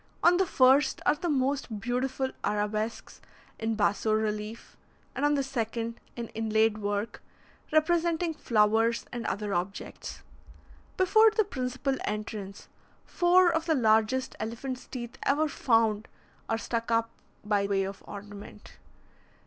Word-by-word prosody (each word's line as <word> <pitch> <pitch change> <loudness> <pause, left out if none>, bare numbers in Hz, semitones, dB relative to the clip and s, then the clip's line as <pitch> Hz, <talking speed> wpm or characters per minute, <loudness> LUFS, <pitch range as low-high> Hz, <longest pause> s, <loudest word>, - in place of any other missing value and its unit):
On 350 +1 +6
the 380 0 +2
first 265 +1 +4
are - - +5
the 335 +3 -3
most 265 -5 0
beautiful 260 +3 -1
arabesques 210 +2 -2 0.4
in 225 0 -1
basso 210 +1 +1
relief, 215 +1 -2 0.4
and 275 - -3
on 290 0 +3
the 275 - +1
second, 230 -3 -3 0.2
in 235 -2 -5
inlaid 220 -1 +1
work, 205 +2 -3 0.5
representing 330 +1 +2
flowers 225 -2 +2
and 240 -1 -4
other 205 -1 -2
objects. 180 +3 -5 0.7
Before 435 +4 +6
the 435 0 +2
principal 265 -5 -2
entrance, 210 -2 -5 0.4
four 355 0 +4
of 320 +1 -1
the 320 - +3
largest 225 +1 +2
elephant's 250 +3 -5
teeth 240 0 -7
ever 300 +3 +2
found 225 -6 +1 0.4
are 225 - +1
stuck 230 0 -3
up 230 0 +1 0.3
by 205 -1 +1
way 195 -1 +1
of 195 +1 -6
ornament. 205 0 -10
230 Hz, 130 wpm, -28 LUFS, 215-275 Hz, 0.7 s, On